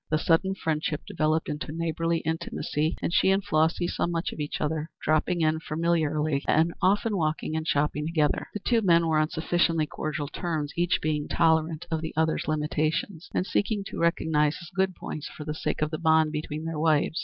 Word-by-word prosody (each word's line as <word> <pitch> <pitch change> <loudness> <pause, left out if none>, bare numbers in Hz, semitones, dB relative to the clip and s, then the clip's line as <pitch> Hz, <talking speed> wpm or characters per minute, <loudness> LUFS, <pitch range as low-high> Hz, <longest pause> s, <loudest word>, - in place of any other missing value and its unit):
The 155 - +2
sudden 175 +4 +2
friendship 155 -3 -1
developed 155 +1 0
into 150 0 -4
neighborly 165 +1 -1
intimacy, 160 -1 -2
and - - -1
she 190 - +4
and 195 +1 +2
Flossy 165 -1 +2
saw - - -1
much 170 0 -2
of - - -10
each 145 0 -3
other, 155 +1 -2
dropping 160 +3 +1
in 155 0 +2
familiarly, 155 -3 0
and 165 +2 +3
often 205 +3 +2
walking 155 -2 -1
and 160 0 -2
shopping 150 +1 0
together. 155 -3 +1
The 210 - -3
two 235 +1 +2
men 170 -4 +4
were 160 -1 +2
on 155 0 +1
sufficiently 165 -1 +1
cordial 150 -1 -4
terms, 155 -2 -3
each 175 +1 +1
being 150 -1 0
tolerant 160 -1 +2
of 160 -1 0
the 160 - -5
other's 160 0 +1
limitations, 155 +3 -1
and 185 - +1
seeking 200 +2 0
to - - -6
recognize 160 -3 +2
his 170 - -11
good 190 -1 +1
points 150 - -6
for 150 - -9
the 150 - -2
sake 155 - -2
of 155 - -1
the 155 - -3
bond 160 -1 +4
between 155 0 -4
their 165 -2 -3
wives. 155 0 +2
160 Hz, 195 wpm, -27 LUFS, 155-170 Hz, -, she